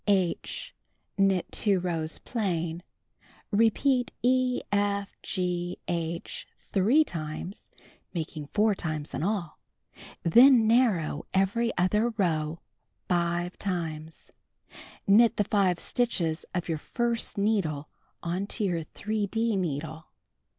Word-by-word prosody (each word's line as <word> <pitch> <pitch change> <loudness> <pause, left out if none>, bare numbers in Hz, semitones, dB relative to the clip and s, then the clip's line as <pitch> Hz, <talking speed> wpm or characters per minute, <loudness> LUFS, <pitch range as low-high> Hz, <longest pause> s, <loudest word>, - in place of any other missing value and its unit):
(H) 190 -4 0 0.4
Knit 195 -2 +3
2 200 -3 +2
rows 165 -3 -2
plain. 175 -7 -2 0.7
Repeat 245 +5 +3
E, 255 0 +2
F, 200 0 0
G, 180 -2 -2
H, 170 0 -3 0.3
3 225 +11 +5
times 165 - -6 0.4
(making 155 -3 -5
4 210 +5 +2
times 155 -5 -4
in - - -2
all). 180 -3 -2 0.6
Then 240 +6 +7
narrow 215 - +2
every 205 +5 +2
other 210 +6 +2
row 160 -4 0 0.5
5 175 0 0
times. 160 -4 -4 0.7
Knit 220 +4 +5
the 210 - +3
5 190 -4 +2
stitches 175 -10 -1
of 175 - -2
your 160 -3 -1
1st 235 +5 -2
needle 190 -9 0 0.4
onto 190 +6 -2
your 175 -4 0
3d 215 +4 -1
needle. 160 -2 -3
185 Hz, 105 wpm, -28 LUFS, 165-215 Hz, 0.7 s, Then